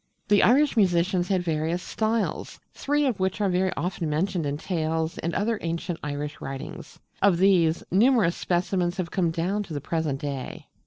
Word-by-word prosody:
The 205 -1 +5
Irish 280 +5 +4
musicians 180 -3 +2
had 185 -2 +1
various 165 +1 -1
'Styles,' 220 0 -2
three 290 +1 0
of 245 -8 0
which 190 +1 -1
are 205 -2 +2
very 185 +1 +1
often 175 -2 -2
mentioned 165 +1 -1
in 140 +1 -2
tales 160 -1 -2
and 170 +1 -3
other 215 +3 0
ancient 170 +1 -3
Irish 145 0 -4
writings: 135 0 -7 0.2
of 195 -3 +4
these, 175 -3 +3
numerous 215 -3 +4
specimens 180 0 -1
have 180 -3 -3
come 175 -3 +1
down 180 +5 -1
to 180 -7 -7
the - - -1
present 150 -1 -2
day. 140 -3 -6
175 Hz, 170 wpm, -26 LUFS, 160-195 Hz, 0.2 s, The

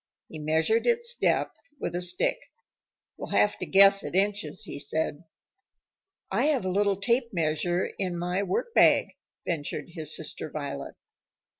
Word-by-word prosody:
He 155 - -8
measured 160 +9 +1
its 475 0 +2
depth - - 0 0.2
with - - -3
a 175 - -2
stick. 180 - +1 0.8
"We'll - - -6
have 210 - +2
to - - -4
guess 195 0 +6
at - - -5
inches," 195 -5 0
he 140 - -6
said. 160 +1 -2 1.1
"I 225 +8 +1
have 285 -9 +1
a 185 - 0
little 200 0 +1
tape 235 +3 +1
measure 175 0 0
in 180 -3 -2
my 180 +2 -1
workbag," 200 - +3 0.4
ventured 150 -2 -3
his 155 -3 -3
sister 155 0 -4
Violet. 145 -2 -6
180 Hz, 145 wpm, -27 LUFS, 160-205 Hz, 1.1 s, guess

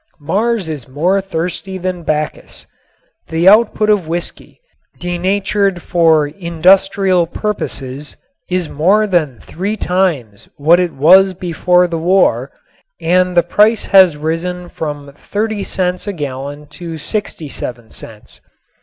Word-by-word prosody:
Mars 200 +6 -1
is 150 -6 -6
more 175 +9 0
thirsty 185 +1 -4
than 185 -1 -4
Bacchus. 155 -1 -4 0.6
The 165 +3 0
output 215 +1 +4
of 195 -6 +1
whiskey, 170 +2 -5 0.4
denatured 190 +1 -1
for 160 -3 +3
industrial 180 +3 +2
purposes, 150 -8 -4 0.3
is 180 -2 -1
more 195 +10 +2
than 160 - 0
three 200 +6 -4
times 165 - -1
what 160 +5 +4
is 180 -1 +1
was 185 +7 +5
before 180 0 +1
the 165 -1 -3
war, 160 -8 +2 0.5
and 180 +2 +1
the 175 - +6
price 210 +6 +2
has 185 -5 +6
risen 175 +3 -3
from 145 -2 -6
30 210 +6 -3
cents 180 0 -2
a 205 - -2
gallon 145 -1 -6
to 165 -2 -8
67 145 - -5
cents. 110 -2 -12
175 Hz, 120 wpm, -15 LUFS, 155-190 Hz, 0.6 s, the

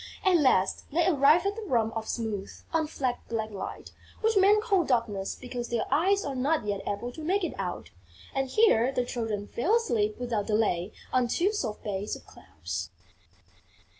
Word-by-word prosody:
At 370 -2 +6
last, 255 - +2
they 335 +3 +2
arrived 305 +1 +5
at 400 +1 0
the 455 - -6
room 230 - 0
of 220 -1 -4
smooth, 215 -4 -3 0.2
unflecked 300 -6 -1
Black 220 -1 -2
Light, 200 - -7 0.3
which 445 0 +2
men 400 +2 +6
call 400 -5 +2
Darkness 230 -8 0
because 245 -1 -6
their 235 -2 0
eyes 385 +8 +3
are 280 - -2
not 270 0 0
yet 200 -1 -2
able 205 +4 -3
to 315 +5 -9
make 380 +5 +1
it 340 - -1
out. 180 -2 -4 0.4
And 270 -1 -1
here 265 - +4
the 250 -2 0
Children 220 -4 -3
fell 355 - +1
asleep 220 - +1
without 235 -4 -2
delay 210 -4 +1 0.2
on 255 -1 +3
two 365 - +1
soft 230 - -3
beds 205 0 -3
of - - -13
clouds. - - -7
250 Hz, 175 wpm, -28 LUFS, 220-335 Hz, 0.4 s, At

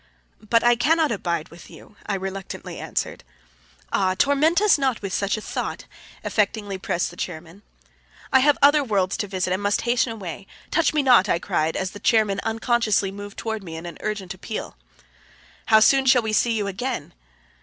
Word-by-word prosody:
"But 230 +2 +2
I 240 0 +5
cannot 310 +5 +2
abide 170 -6 -2
with 170 - -14
you," - - -15
I 205 - 0
reluctantly 195 0 -6
answered. - - -4 0.7
"Ah, 185 -1 +2
torment 290 +5 +3
us 415 -7 +4
not 265 -4 0
with 195 -1 -4
such 200 +2 0
a - - -6
thought," - - -4 0.4
affectingly 205 -2 -1
pressed 170 -2 -1
the - - -13
chairman. 170 +2 -7 0.7
"I 265 - +7
have 290 +2 +4
other 290 +1 +6
worlds 200 -6 0
to 205 - -3
visit, 185 -1 -1
and 190 - -2
must 205 0 +1
hasten 240 0 +1
away. 195 -3 -7 0.2
Touch 335 0 +2
me 300 -2 +1
not," 240 -7 +5
I - - +3
cried 160 -1 -1
as 185 -1 -2
the 205 - -10
chairman 210 -3 +2
unconsciously 225 -3 +1
moved 205 0 -9
toward 220 -1 -3
me 165 -3 -8
in 165 +1 -7
an 170 -2 -8
urgent 210 -4 -4
appeal. 200 - -6 0.9
"How 220 -1 +6
soon 270 +4 +4
shall 250 -2 +5
we 220 -1 -2
see 235 +2 +2
you 210 -2 -1
again?" 235 +6 -4
210 Hz, 185 wpm, -23 LUFS, 190-240 Hz, 0.9 s, I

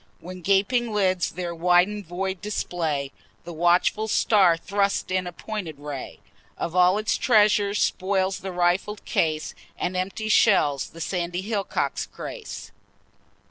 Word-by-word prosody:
When 185 +1 -9
gaping 205 +6 +2
lids 185 -4 +1
their 175 0 -5
widen'd 180 +3 +2
void 190 +2 -3
display, 160 -9 -2 0.3
The 175 - -8
watchful 175 +6 +2
star 195 -5 +4
thrusts 200 +2 -1
in 185 -1 0
a - - -5
pointed 180 -5 -6
ray, 145 -2 -7 0.4
Of 170 +1 -4
all 180 +2 +5
its 215 0 0
treasures 210 -3 +3
spoils 190 0 0
the 190 - -6
rifled 180 +4 0
case, 155 -1 0 0.2
And 185 - -2
empty 195 +4 -3
shells 165 - +3
the 165 - -11
sandy 175 +2 -2
hillock 205 -1 -4 0.3
grace. 475 -3 -8
185 Hz, 135 wpm, -24 LUFS, 175-205 Hz, 0.4 s, all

